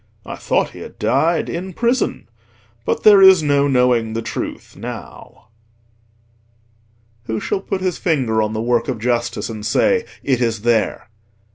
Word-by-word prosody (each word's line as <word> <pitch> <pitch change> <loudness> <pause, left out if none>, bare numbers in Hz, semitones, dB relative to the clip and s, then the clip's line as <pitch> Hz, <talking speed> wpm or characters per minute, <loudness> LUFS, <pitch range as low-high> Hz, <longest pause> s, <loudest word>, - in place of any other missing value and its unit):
I - - -6
thought - - -1
he - - -12
had - - -10
died 165 0 +1
in 185 +2 -5
prison. 240 +6 -1 0.6
But - - -1
there 205 -2 +7
is 190 -4 +7
no 145 -1 +2
knowing 125 -4 +2
the 115 0 -3
truth - - -6
now." 110 - -10 1.8
Who 110 -1 -3
shall 190 - -2
put 195 -1 -4
his 185 -2 -2
finger 130 -10 +1
on 105 0 -1
the 110 0 -3
work 120 0 +1
of - - -2
justice, 120 -1 -1
and 110 -2 -7
say, 230 - +1 0.2
"It 130 -3 0
is 110 -3 -1
there"? 115 -2 0
125 Hz, 155 wpm, -19 LUFS, 110-180 Hz, 1.8 s, there